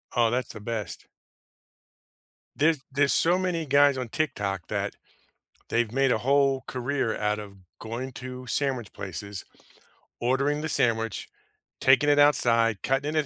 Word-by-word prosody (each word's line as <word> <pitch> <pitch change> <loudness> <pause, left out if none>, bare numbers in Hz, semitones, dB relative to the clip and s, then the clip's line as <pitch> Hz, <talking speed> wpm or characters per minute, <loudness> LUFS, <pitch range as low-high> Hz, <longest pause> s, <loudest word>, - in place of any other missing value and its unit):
Oh, 120 -2 +4
that's 125 +1 -2
the 110 - -8
best. 110 -2 -5 1.5
There's 155 0 +2
there's 140 0 +2
so 175 +2 +3
many 180 -3 -1
guys 140 0 +4
on 125 -3 -4
TikTok 100 - -2
that - - -3 0.7
they've 115 -2 +1
made 135 0 +2
a 110 - +2
whole 135 +1 +2
career 130 -2 -1
out 105 0 0
of 100 -2 -10 0.2
going 120 +4 -5
to 125 0 -8
sandwich 130 -4 -1
places, 100 +1 -6 0.8
ordering 140 +4 +1
the 160 - -3
sandwich, 115 -6 0 0.5
taking 130 +2 +4
it 145 - +4
outside, 115 -7 +3
cutting 135 +3 0
it - - +4
130 Hz, 140 wpm, -26 LUFS, 115-140 Hz, 1.5 s, Oh